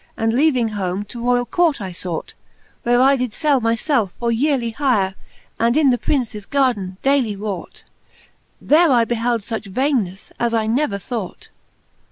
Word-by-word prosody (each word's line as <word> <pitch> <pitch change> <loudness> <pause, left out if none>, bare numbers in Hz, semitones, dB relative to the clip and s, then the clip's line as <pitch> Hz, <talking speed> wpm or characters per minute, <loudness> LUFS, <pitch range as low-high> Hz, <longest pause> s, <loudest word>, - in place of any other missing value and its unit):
And 225 0 0
leaving 255 -4 +2
home, 195 -1 -3
to 235 +3 -9
roiall 245 0 +1
court 335 -6 +2
I 190 -3 -6
fought; 175 -1 -5 0.5
Where 245 +1 +2
I 270 +2 +5
did 250 -4 -2
fell 290 -5 +2
my 230 0 +2
felfe 235 - 0
for 235 -1 0
yearely 245 -1 +1
hire, 220 -9 +1 0.5
And 235 +4 +2
in 290 -4 +5
the 245 - 0
Princes 220 -7 -2
gardin 235 -10 0
daily 270 -6 +2
wrought: 200 -2 -6 0.8
There 320 +1 +4
I 235 -3 +4
behelde 235 -1 -1
fuch 220 -2 -5
vainenefTe, 225 -7 -1
as 235 -1 +1
I 220 -1 +1
never 225 -1 0
thought. 205 -1 -6
235 Hz, 165 wpm, -20 LUFS, 210-270 Hz, 0.8 s, I